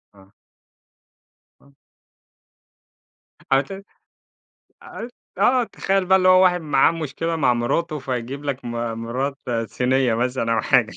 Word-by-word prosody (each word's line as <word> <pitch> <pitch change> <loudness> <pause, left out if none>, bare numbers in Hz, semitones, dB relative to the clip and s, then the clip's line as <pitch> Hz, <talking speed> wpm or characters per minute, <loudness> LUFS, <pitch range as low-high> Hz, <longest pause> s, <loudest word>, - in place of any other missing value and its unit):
آه. 95 0 -20 1.3
آه. 140 - -23 1.8
على 135 +1 +4
كده 195 +6 -10 1.0
آ 235 - -8 0.3
آه، 250 -1 +3
تخيّل 195 -3 -1
بقى 190 +1 +5
اللي 185 0 +3
هو 185 0 +7
واحد 180 -1 +3
معاه 145 -1 +3
مشكلة 165 +1 -3
مع 130 -5 +2
مِراته، 150 +7 -1
فيجيب 130 +2 -5
لك 140 -2 -4
م 120 - -5 0.3
مِرات 135 +4 -3 0.3
صينيّة 125 -1 +1
مثلًا 120 -1 -1
أو - - +2
حاجة. - - +2
140 Hz, 125 wpm, -22 LUFS, 125-175 Hz, 1.8 s, هو